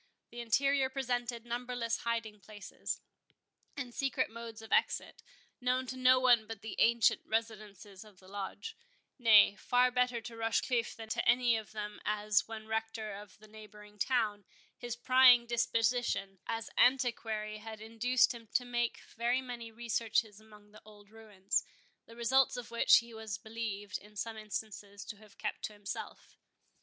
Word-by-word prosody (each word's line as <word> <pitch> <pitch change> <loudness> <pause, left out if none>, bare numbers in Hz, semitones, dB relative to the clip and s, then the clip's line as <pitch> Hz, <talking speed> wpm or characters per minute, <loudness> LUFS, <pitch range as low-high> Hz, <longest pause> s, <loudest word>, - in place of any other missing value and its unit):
The 240 - -8
interior 270 +3 +2
presented 245 -3 -2
numberless 240 -1 -2
hiding 225 -2 -3
places, 205 +1 -6 0.8
and 250 -4 -5
secret 270 -3 -1
modes 230 -1 -8
of 220 - -12
exit, - - +1 0.4
known 255 +1 +1
to 260 - -5
no 255 0 +5
one 240 -4 +4
but 225 -2 -8
the 220 - -6
ancient 235 0 +4
residents 220 -3 -3 0.2
of 210 -3 -18
the 185 - -18
Lodge—nay, 210 - +1
far 250 0 +3
better 250 -1 +1
to 230 0 -9
Rochecliffe 230 +1 0
than 225 -1 -9
to - - 0
any 245 -1 +4
of 220 -2 -5
them; 210 -1 -6
as, 210 -1 +1
when 220 -1 -7
Rector 220 -1 -3
at 205 +1 -9
the 215 - -17
neighbouring 210 -1 -14
town, 215 -5 0 0.3
his 240 -1 -5
prying 250 0 +6
disposition 230 -4 0
as 225 0 -3
an - - -6
antiquary 225 -4 +1
had 220 0 -8
induced 230 +4 +2
him 230 -1 -11
to 250 - +2
make 240 -1 -1
very 240 +2 +1
many 240 -3 -7
researches 225 -2 -1
among 210 -1 -18
the 215 - -15
old 210 -1 -17
ruins—the 220 +1 -5
results 250 +2 +3
of 245 - -7
which 235 - +6
he 235 0 -3
was 220 -3 -5
believed, 205 -2 -5
in 210 +1 -18
some 225 +2 -4
instances, 210 -1 -6
to 210 - -7
have 215 -1 -18
kept 210 - -4
to 215 - -7
himself. 205 -1 -8
225 Hz, 155 wpm, -33 LUFS, 210-240 Hz, 0.8 s, prying